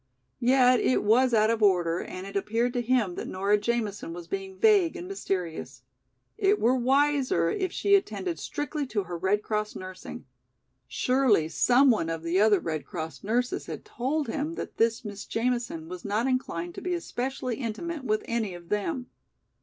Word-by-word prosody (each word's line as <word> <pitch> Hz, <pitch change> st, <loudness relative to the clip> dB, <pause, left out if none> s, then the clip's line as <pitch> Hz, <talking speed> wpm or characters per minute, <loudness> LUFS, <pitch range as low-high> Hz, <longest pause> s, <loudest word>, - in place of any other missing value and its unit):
Yet 250 Hz, 0 st, +5 dB
it 255 Hz, -, +2 dB
was 245 Hz, +5 st, +4 dB
out 220 Hz, -1 st, +4 dB
of 230 Hz, -1 st, -1 dB
order 175 Hz, -4 st, +3 dB
and 185 Hz, +1 st, -7 dB
it 195 Hz, -, -9 dB
appeared 230 Hz, +5 st, 0 dB
to 245 Hz, -, 0 dB
him 235 Hz, -6 st, +1 dB
that -, -, -5 dB
Nora 200 Hz, +3 st, +1 dB
Jamison 210 Hz, -5 st, -2 dB
was 175 Hz, 0 st, -8 dB
being 385 Hz, -1 st, -5 dB
vague 400 Hz, -5 st, +4 dB
and 360 Hz, 0 st, -6 dB
mysterious. 185 Hz, -, -4 dB, 0.6 s
It 405 Hz, 0 st, +3 dB
were 245 Hz, +3 st, +3 dB
wiser 260 Hz, -8 st, +2 dB
if 375 Hz, -2 st, -1 dB
she 400 Hz, -, +1 dB
attended 195 Hz, -, +1 dB
strictly 295 Hz, -1 st, -3 dB
to 210 Hz, -5 st, -1 dB
her 175 Hz, -1 st, -6 dB
Red 190 Hz, +4 st, +1 dB
Cross 215 Hz, -1 st, -2 dB
nursing. 185 Hz, 0 st, -8 dB, 0.6 s
Surely 250 Hz, -11 st, +2 dB
some 250 Hz, -, +5 dB
one 185 Hz, -8 st, 0 dB
of 165 Hz, 0 st, -4 dB
the 170 Hz, +3 st, +1 dB
other 210 Hz, -2 st, +5 dB
Red 155 Hz, -3 st, -3 dB
Cross 160 Hz, -2 st, -6 dB
nurses 245 Hz, +4 st, -1 dB
had -, -, -7 dB
told 280 Hz, +5 st, -2 dB
him 300 Hz, +7 st, -3 dB
that -, -, -6 dB
this 230 Hz, +1 st, +1 dB
Miss 205 Hz, -1 st, -6 dB
Jamison 235 Hz, -8 st, -2 dB
was 180 Hz, 0 st, -8 dB
not 210 Hz, +3 st, 0 dB
inclined 175 Hz, -10 st, -2 dB
to -, -, -8 dB
be 360 Hz, -1 st, -1 dB
especially 255 Hz, -6 st, -3 dB
intimate 275 Hz, +6 st, -4 dB
with 215 Hz, -4 st, 0 dB
any 220 Hz, -6 st, -2 dB
of 170 Hz, -1 st, -13 dB
them. 245 Hz, +6 st, -1 dB
230 Hz, 175 wpm, -27 LUFS, 190-260 Hz, 0.6 s, Yet